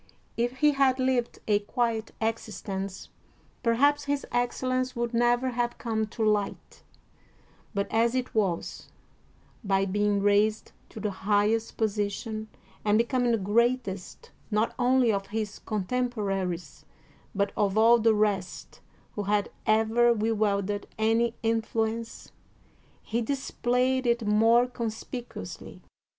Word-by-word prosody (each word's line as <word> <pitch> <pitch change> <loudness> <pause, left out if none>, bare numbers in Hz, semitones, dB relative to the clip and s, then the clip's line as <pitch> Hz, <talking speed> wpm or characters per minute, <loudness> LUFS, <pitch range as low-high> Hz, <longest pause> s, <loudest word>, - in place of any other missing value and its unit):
If 240 +2 -1
he 300 0 +6
had 275 -2 +3
lived 255 -2 0
a 205 -1 +3
quiet 225 +1 -1
existence, 200 -3 -4 0.5
perhaps 285 +5 +3
his 285 0 -1
excellence 255 +1 -1
would 235 0 -2
never 240 +2 +2
have 240 0 -1
come 220 -2 -2
to 220 +1 -4
light; 210 -2 -1 0.9
but 200 0 0
as 230 +2 +2
it 255 -1 -2
was, 195 -6 -1 0.7
by 195 -1 +2
being 205 +1 +1
raised 205 +2 +2 0.2
to - - -9
the 210 -1 -2
highest 210 +3 0
position 215 0 -2 0.4
and 210 0 +3
be 230 - +4
coming 245 -1 +1
the 230 - +3
greatest 210 -1 -1 0.2
not 215 +1 +1
only 250 -1 +4
of 195 -1 -2
his 210 0 -4
contempora 210 -3 -1
ries 175 0 -7 0.5
but 200 0 +1
of 205 0 +1
all 230 +2 +6
the 225 0 +4
rest 200 -4 -1 0.3
who 210 - -3
had 205 0 0 0.2
ever 225 +2 +4
wielded 205 -2 0
any 225 +2 +2
influence, 225 0 -2 0.7
he 235 +2 -1
displayed 255 0 0
it 235 -1 +1
more 225 +3 +4
conspicuously. 240 0 -6
225 Hz, 125 wpm, -27 LUFS, 205-240 Hz, 0.9 s, he